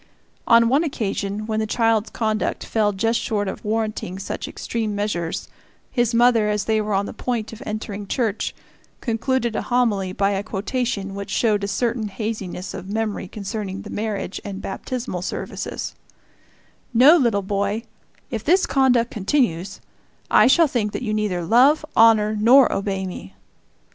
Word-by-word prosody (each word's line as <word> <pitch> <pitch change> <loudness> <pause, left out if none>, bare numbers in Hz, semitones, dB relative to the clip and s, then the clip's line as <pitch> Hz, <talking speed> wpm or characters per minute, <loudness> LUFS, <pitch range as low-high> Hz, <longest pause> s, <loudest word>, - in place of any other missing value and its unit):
On 230 0 +6
one 275 +7 +3
occasion, 210 -7 -2
when 220 0 -1
the 220 - -1
child's 225 -1 +1
conduct 215 -1 -1
fell 215 -2 +1
just 225 +4 0
short 205 -2 -1
of - - -5
warranting 215 -4 -2
such 195 - -5
extreme 220 -3 -3
measures, 190 -5 -2 0.4
his 240 -2 +1
mother, 235 -2 +4
as 210 -1 -1
they 220 -1 +2
were 210 -1 -1
on 200 +1 +1
the - - -6
point 230 -3 -3
of 225 - -10
entering 210 -1 -5
church, 220 -1 -1 0.4
concluded 235 0 -1
a - - 0
homily 220 -7 +1
by 195 +1 +1
a 195 -1 -1
quotation 210 0 -3
which 200 0 -6
showed 210 -3 +1
a - - 0
certain 225 +2 -1
haziness 200 -3 -5
of 190 - -7
memory 215 -2 -2
concerning 200 0 -5
the 210 - -9
marriage 210 -3 -3
and 195 -1 -6
baptismal 215 -1 -4
services: 185 - -5 1.0
"No, 270 +8 +8
little 235 - +2
boy, 200 +3 -1 0.5
if 225 -3 -3
this 365 +8 +4
conduct 250 -3 +2
continues, 195 - 0 0.5
I - - +6
shall 325 +6 +6
think 220 -6 -1
that - - -4
you 215 -3 -1
neither 205 -5 -1
love, 260 - +4
honor, 215 -2 +5
nor 245 +6 +6
obey 195 -1 -2
me!" 95 - -8
215 Hz, 160 wpm, -22 LUFS, 200-235 Hz, 1.0 s, No